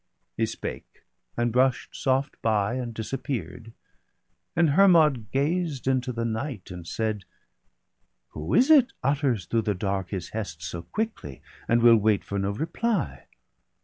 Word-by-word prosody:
He - - +1
spake, - - -7 0.3
and 120 0 +1
brush'd 130 0 +1
soft 135 +1 -1
by, 105 -1 +1
and 125 -2 -3
disappear'd. 115 0 -5 0.8
And 165 -3 +4
Hermod 155 - +5
gazed 150 0 -1
into 130 -1 +1
the 115 -1 -3
night, 115 -3 -4
and 90 -2 -8
said: 110 -1 -2 0.4
— - - -50
' - - -50
Who 75 +5 -3
is 260 +5 +5
it 270 -5 +6
utters 135 - +1
through 115 +5 +1
the 105 -2 -1
dark 95 -1 -2
his 95 -4 -4
hest 95 -8 -5
So 85 +1 -5
quickly, 210 - -5 0.2
and 115 0 +3
will 115 -1 +8
wait 105 -1 +2
for 100 - -3
no 95 0 0
reply? 160 - -2
120 Hz, 150 wpm, -26 LUFS, 100-140 Hz, 0.8 s, will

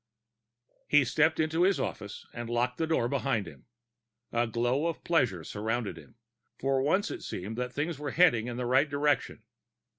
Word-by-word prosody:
He 145 -2 +5
stepped 160 +5 +2
into 160 +1 +1
his 190 +2 +3
office 105 -1 -5
and 120 -1 -6
locked 120 +1 0
the 160 - +1
door 160 -7 +1
behind 130 -5 0
him. 70 -5 -13 0.6
A 120 0 +1
glow 120 +7 0
of 165 - -4
pleasure 125 - +1
surrounded 110 +4 -3
him; - - -15 0.4
for 135 0 +1
once 190 - +1
it - - -6
seemed 100 +5 -5
that 125 0 -2
things 145 +2 -3
were 145 -1 -3
heading 135 -9 +4
in 120 -1 -4
the 125 - -2
right 130 +5 +3
direction. 145 -1 0
130 Hz, 175 wpm, -29 LUFS, 120-155 Hz, 0.6 s, He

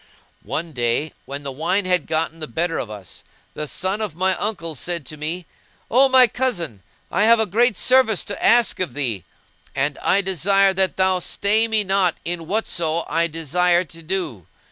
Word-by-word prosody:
One 165 +1 -4
day 125 +3 -1
when 140 +1 -6
the 140 - -4
wine 170 +8 0
had 180 -3 +1
gotten 160 +1 -1
the 155 - -5
better 165 +7 -2
of 115 - -4
us, 100 -4 -9 0.3
the 150 - -4
son 190 +7 -2
of 210 -8 -3
my 185 +2 +1
uncle 175 -6 -3
said 170 +2 -4
to 155 - -8
me, 160 +4 -4 0.5
"O 265 +3 +5
my 260 -1 +7
cousin, 195 - -2 0.3
I 200 +4 +2
have 230 0 +6
a 220 - +2
great 220 +2 +2
service 255 -6 +3
to 200 - -6
ask 235 -1 +4
of 185 -5 -3
thee; 120 - -2 0.5
and 145 +2 -1
I 200 - +2
desire 195 +1 +2
that 190 0 0
thou 185 -1 +2
stay 210 +5 +1
me 220 -2 +1
not 190 -3 +2
in 170 -1 -4
whatso 170 -5 -1
I 165 +2 +1
desire 175 +3 +1
to 165 -2 -13
do!" 160 - -4
175 Hz, 185 wpm, -21 LUFS, 155-200 Hz, 0.5 s, my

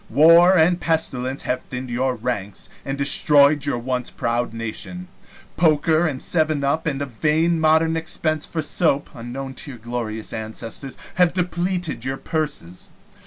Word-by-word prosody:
War 170 +7 +6
and 175 +2 +3
pestilence 135 -5 -1
have 125 0 -1
thinned 125 0 -7
your 130 +1 0
ranks 105 -5 -5
and 135 0 -4
destroyed 145 +1 +4
your 140 - 0
once 125 0 -2
proud 120 0 -2
nation. 115 +11 -6 0.5
Poker 160 0 +3
and 135 -4 -3
seven 155 -4 +1
up, 155 +4 0
and 140 -2 -1
a - - -2
vain 155 +6 +1
modern 160 +1 +3
expense 155 -1 -1
for 160 -2 -3
soap, 145 -2 +1
unknown 130 +3 -7
to 135 - -2
your 130 - -8
glorious 110 -1 -5
ancestors, 115 +4 -6 0.2
have 180 -2 +4
depleted 175 -4 -2
your 135 +1 -3
purses. 145 - -4
140 Hz, 150 wpm, -22 LUFS, 125-160 Hz, 0.5 s, War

